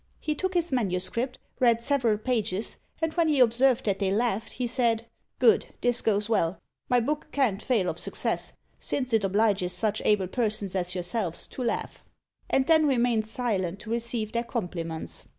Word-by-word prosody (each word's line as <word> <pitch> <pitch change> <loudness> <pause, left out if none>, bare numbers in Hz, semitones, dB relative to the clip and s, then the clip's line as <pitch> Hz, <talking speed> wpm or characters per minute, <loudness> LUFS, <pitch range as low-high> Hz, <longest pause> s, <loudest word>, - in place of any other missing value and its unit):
'" - - -38
He 305 - -1
took 370 +5 -3
his 345 -2 +1
manuscript, 230 +2 -1 0.2
read 235 -2 +4
several 235 -4 +1
pages, 220 -3 -2 0.2
and 320 -1 0
when 335 -2 +2
he 295 -3 +2
observed 250 +1 +4
that 200 -2 0
they 195 -2 +1
laughed, 220 +1 0
he 250 - -2
said, 235 -2 +1 0.3
"Good, 450 -1 +4
this 245 0 +3
goes 210 -1 +1
well; 195 -5 +1 0.3
my 245 - +4
book 295 +7 -2
can't 230 -8 +1
fail 225 -8 +1
of - - -1
success, - - -1 0.3
since 255 -3 -2
it 220 -2 +3
obliges 195 -2 +1
such 210 +3 0
able 205 -3 +3
persons 210 -2 -1
as 180 -1 -2
yourselves 180 0 -2
to - - -7
laugh;" 235 - -3 0.5
and 265 - +2
then 315 -1 +4
remained 240 -4 +2
silent 205 -6 -2
to 225 - -8
receive 235 -2 -2
their 235 0 -1
compliments. 175 -9 -4
230 Hz, 175 wpm, -27 LUFS, 200-250 Hz, 0.5 s, read